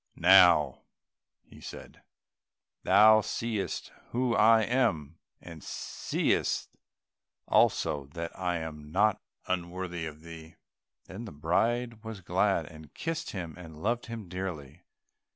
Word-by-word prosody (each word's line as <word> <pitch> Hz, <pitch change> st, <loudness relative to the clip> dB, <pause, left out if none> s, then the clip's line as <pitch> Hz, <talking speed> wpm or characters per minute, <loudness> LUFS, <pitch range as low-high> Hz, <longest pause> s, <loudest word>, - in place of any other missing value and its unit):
"Now," 90 Hz, -6 st, +6 dB, 0.8 s
said -, -, -10 dB
he, -, -, -24 dB, 0.9 s
"thou 110 Hz, +3 st, +7 dB
seest 110 Hz, -2 st, -3 dB, 0.2 s
who 125 Hz, 0 st, 0 dB
I 110 Hz, 0 st, +5 dB
am, 85 Hz, -, 0 dB, 0.2 s
and 85 Hz, -3 st, -11 dB
seest -, -, -2 dB, 0.7 s
also 70 Hz, -2 st, +2 dB
that 85 Hz, 0 st, -4 dB
I 90 Hz, -2 st, -1 dB
am 75 Hz, -2 st, -7 dB
not 105 Hz, +4 st, +2 dB, 0.2 s
unworthy 90 Hz, -1 st, -3 dB
of 75 Hz, 0 st, -10 dB
thee." 80 Hz, -1 st, -11 dB, 0.5 s
Then 100 Hz, +5 st, -8 dB
the -, -, -8 dB
bride 115 Hz, +10 st, -1 dB
was 110 Hz, -3 st, -7 dB
glad, -, -, +1 dB
and 80 Hz, -2 st, -13 dB
kissed 165 Hz, 0 st, -3 dB
him, 85 Hz, -5 st, -6 dB
and 80 Hz, -3 st, -11 dB
loved 120 Hz, +3 st, -1 dB
him 115 Hz, -4 st, -7 dB
dearly. 85 Hz, -4 st, -6 dB
90 Hz, 115 wpm, -29 LUFS, 80-110 Hz, 0.9 s, thou